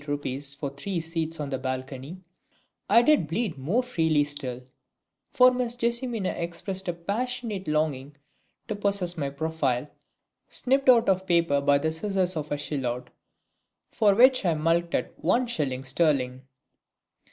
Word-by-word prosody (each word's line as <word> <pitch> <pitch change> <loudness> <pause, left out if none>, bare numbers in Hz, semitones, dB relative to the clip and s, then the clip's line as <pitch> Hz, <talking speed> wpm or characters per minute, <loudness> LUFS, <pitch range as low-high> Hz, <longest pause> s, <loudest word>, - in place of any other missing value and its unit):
8 140 -1 -3
for 140 -2 -3
three 170 +6 -3
seats 165 0 -3
on 145 -1 -4
the 135 - -2
balcony) 130 +6 -5 0.7
I 230 +4 +6
did 300 - +4
bleed 185 +2 -1
more 190 - +1
freely 160 -11 +2
still, 135 -4 -4 0.7
for 255 0 +6
Miss 250 -1 -2
JESSIMINA 235 -4 -1
expressed 185 +3 -5
a 175 - 0
passionate 210 +2 -3
longing 150 -2 -1 0.5
to 215 - -3
possess 200 -4 -1
my 140 -4 -2
profile, 140 -3 -1 0.6
snipped 270 +1 +1
out 235 -2 +6
of 190 0 +1
paper 165 -5 +3
by 140 0 +4
the 160 +3 -1
scissors 185 +1 -1
of 150 -1 -4
a 145 - 0
Silhouette, 130 -4 -3 0.8
for 205 -3 +3
which 255 +2 +6
I 170 -4 +2
mulcted 165 +2 0
one 250 +2 +2
shilling 140 - -2
sterling. 130 -2 0
165 Hz, 140 wpm, -26 LUFS, 140-205 Hz, 0.8 s, I